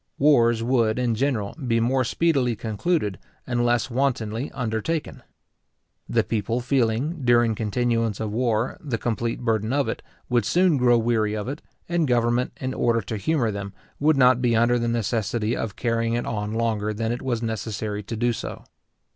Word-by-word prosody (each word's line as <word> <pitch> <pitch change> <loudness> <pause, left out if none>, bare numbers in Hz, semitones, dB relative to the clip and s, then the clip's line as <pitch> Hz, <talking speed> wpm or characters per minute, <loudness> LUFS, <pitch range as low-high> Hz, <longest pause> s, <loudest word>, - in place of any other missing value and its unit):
Wars 120 -6 +4
would, 115 -3 +2
in 125 -2 +1
general, 115 -4 -1
be 115 -1 +2
more 130 +3 +2
speedily 135 -4 +1
concluded, 110 - -1 0.3
and 120 -1 0
less 120 +1 +1
wantonly 120 -1 -1
undertaken. 125 +6 -3 0.9
The - - +2
people 115 +2 -1
feeling, 130 +5 0
during 120 -2 +4
continuance 115 0 0
of 110 -1 -3
war, 115 0 0
the 135 -7 -2
complete 115 +1 -2
burden 110 -2 0
of 140 0 +1
it, - - -3 0.3
would 120 -3 +2
soon 175 - +3
grow 120 -2 +4
weary 110 -2 +1
of 105 +1 -4
it; 145 +4 -5 0.3
and 170 -3 +1
government, 120 0 +1
in 130 0 -3
order 115 -2 +1
to 105 +2 -5
humour 125 0 0
them, 100 -1 -6 0.3
would 150 0 +3
not 125 -1 +5
be 120 -2 +2
under 120 +2 +3
the 120 - -1
necessity 115 0 -1
of 105 -3 -4
carrying 115 -1 0
it 120 - -2
on 105 0 -3
longer 110 -2 -1
than 115 +1 -1
it 120 - -3
was 120 -3 -2
necessary 110 -2 -3
to 105 +3 -6
do 120 +1 +1
so. - - -6
120 Hz, 170 wpm, -24 LUFS, 110-125 Hz, 0.9 s, not